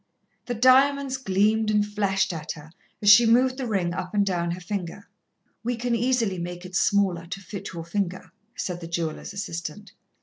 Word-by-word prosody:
The 245 - -2
diamonds 265 +3 +4
gleamed 215 -1 +1
and 210 -1 +2
flashed 200 -3 0
at 155 -2 -5
her 150 0 -13 0.3
as 205 - +5
she 230 +3 +8
moved 255 +3 +4
the 260 -2 -3
ring 185 -6 0
up 180 +3 -5
and 205 -1 +3
down 175 -3 -1
her 175 +2 -3
finger. 185 +1 -5 0.6
"We 245 +1 -1
can 240 +1 -2
easily 230 -5 +1
make 175 +1 -6
it 185 0 -8
smaller, 190 -5 +2
to 190 - -5
fit 195 0 -7
your 165 -1 -6
finger," 185 0 -3 0.3
said 180 -1 -4
the 165 - -6
jeweller's 165 -2 -3
assistant. 200 -1 -6
200 Hz, 180 wpm, -25 LUFS, 175-230 Hz, 0.6 s, she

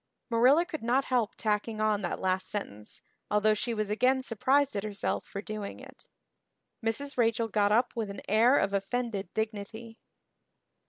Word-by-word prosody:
Marilla 260 +9 +5
could 320 -3 -6
not 250 +4 +1
help 230 -4 +1
tacking 215 0 -1
on 215 -1 +1
that 180 - -3
last 185 0 0
sentence, 105 - -6 0.3
although 210 +1 +3
she 225 +3 -2
was 215 -2 -2
again 255 +4 +2
surprised 265 +3 +1
at 200 - -2
herself 205 -2 -2
for 200 - -6
doing 215 -1 -6
it. - - -13 0.8
Mrs. 275 +6 -1
Rachel 230 -1 +2
got 205 -1 +2
up 240 +3 +2
with 225 -3 -2
an 200 - -8
air 235 +6 +5
of 195 - +1
offended 200 +1 -2
dignity. 220 +1 -4
220 Hz, 160 wpm, -29 LUFS, 205-240 Hz, 0.8 s, Marilla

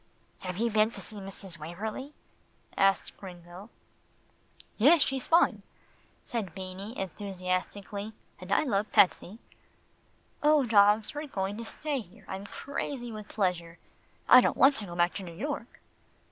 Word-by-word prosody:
"Have 180 -1 -5
you 230 +2 +1
been 215 +1 +4
to 215 - -8
see 210 +3 -5
Mrs. 195 -3 -5
Waverlee?" 215 - -6 0.6
asked 195 0 +2
Gringo. 180 +2 -11 1.1
"Yes, 290 +6 +6
she's 265 -2 -2
fine," 335 +1 +4 0.6
said 220 -7 -4
Beanie 190 +4 -7
enthusiastically, 195 +2 -4 0.3
"and 185 0 -9
I 200 - +4
love 215 -7 -1
Patsie. 190 +2 +3 1.0
Oh! 300 -2 +4
dogs, 210 -1 +4
we're 295 +1 -5
going 195 -5 -3
to 230 - -6
stay 290 +4 -3
here. 200 -1 -13
I'm 195 +1 -6
crazy 265 -2 -5
with 215 -1 -8
pleasure. 175 -4 -2 0.5
I 250 - +9
didn't - - 0
want 270 +1 +6
to 205 - -2
go 175 - -8
back 175 0 +2
to 195 - -5
New 170 -2 -9
York." 265 - -5
205 Hz, 145 wpm, -29 LUFS, 185-235 Hz, 1.1 s, I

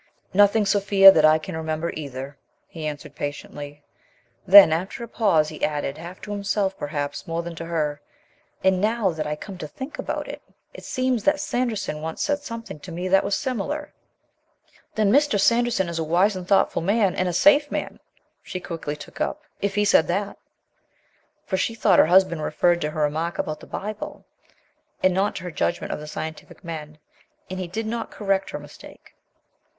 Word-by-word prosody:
"Nothing, 205 +2 +5
Sophia, 200 -1 +7
that 155 -4 +4
I 155 0 +6
can 160 +3 -7
remember 160 +1 -2
either," 140 -2 -6 0.3
he 160 -2 -6
answered 150 -1 -7
patiently. 145 0 -7 0.6
Then, 190 -4 +10
after 185 +8 -3
a - - -6
pause, 175 -10 +2
he 155 - -9
added, 145 -1 -1
half 175 +3 -9
to 210 - -7
himself 200 -1 -1
perhaps 145 -1 -4
more 165 +1 -2
than 170 0 -6
to 165 - -5
her: 150 -3 -2 0.6
"And, 190 -1 +3
now 215 -2 +1
that 160 -2 -4
I 150 - -2
come 185 +4 -9
to 155 - -5
think 265 - -8
about - - -3
it, - - -7 0.3
it - - -11
seems 255 -3 0
that 295 0 +3
Sanderson 240 - -2
once 160 0 -3
said 290 -1 0
something 230 - -8
to 175 - -10
me 180 +2 -4
that 195 +1 +4
was 200 - 0
similar. 285 +4 -3 1.0
"Then 215 -3 +3
Mr. 285 -4 +3
Sanderson 235 -2 +2
is 170 -1 -3
a - - 0
wise 180 +6 +2
and 180 -1 -6
thoughtful 195 -3 +3
man, 200 +1 +2
and 185 -1 0
a - - -1
safe 290 - +5
man," - - -4 0.4
she 185 - -6
quickly 165 -4 -5
took 150 - -11
up, - - -2 0.2
"if 200 -1 -1
he 210 0 +2
said 160 -6 +4
that." 200 +3 -2 1.1
For 190 - -1
she 230 - -1
thought 200 -5 +4
her - - +6
husband 180 -2 +4
referred 175 +2 +1
to 150 - -1
her 155 0 -4
remark 160 +4 -1
about 155 0 -3
the - - -13
Bible, 210 +1 -6 0.8
and 185 - +4
not 195 +3 0
to 185 - -6
her 180 - -5
judgment 175 - -1
of - - -5
the 150 - -8
scientific 160 +1 -7
men. 155 -3 -7 0.5
And 185 - -4
he 185 - -3
did 220 +6 -4
not 230 +1 -3
correct 195 -2 -1
her - - -4
mistake. - - -14
185 Hz, 190 wpm, -24 LUFS, 155-205 Hz, 1.1 s, Then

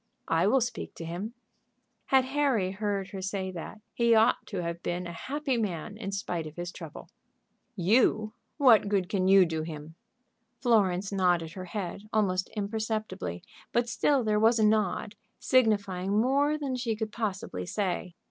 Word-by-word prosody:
"I 165 +3 +3
will 265 +4 +4
speak 245 - -4
to 165 - -7
him." 190 +8 -5 0.7
Had 265 -1 +4
Harry 265 -9 +1
heard 200 -1 -2
her 190 0 -6
say 190 0 -3
that, 180 +4 -8
he 235 -1 +4
ought 225 +3 +3
to 190 -4 -3
have 170 0 -4
been 180 +1 -3
a 170 - -5
happy 270 - -2
man 205 -2 -3
in 210 -3 -5
spite 175 -5 -3
of 155 - -11
his 175 0 -5
trouble. - - -9 0.7
"You! 215 +2 +2 0.2
What 245 -8 +6
good 195 -3 0
can 185 -2 +1
you 195 -1 +7
do 160 -2 -2
him?" 155 -1 -7 0.7
Florence 200 -6 +2
nodded 175 -4 +1
her 185 +1 -7
head, 195 0 -5
almost 185 -4 +1
imperceptibly, 215 - -3 0.3
but 240 0 +1
still 265 +3 +2
there 210 -1 +2
was 225 +2 +4
a 215 - +4
nod, 210 0 +1 0.2
signifying 200 -5 +2
more 280 +5 +2
than 280 -4 -3
she 240 -3 -1
could 215 0 -4
possibly 190 - -4
say. 180 -3 -2
205 Hz, 165 wpm, -29 LUFS, 180-225 Hz, 0.7 s, you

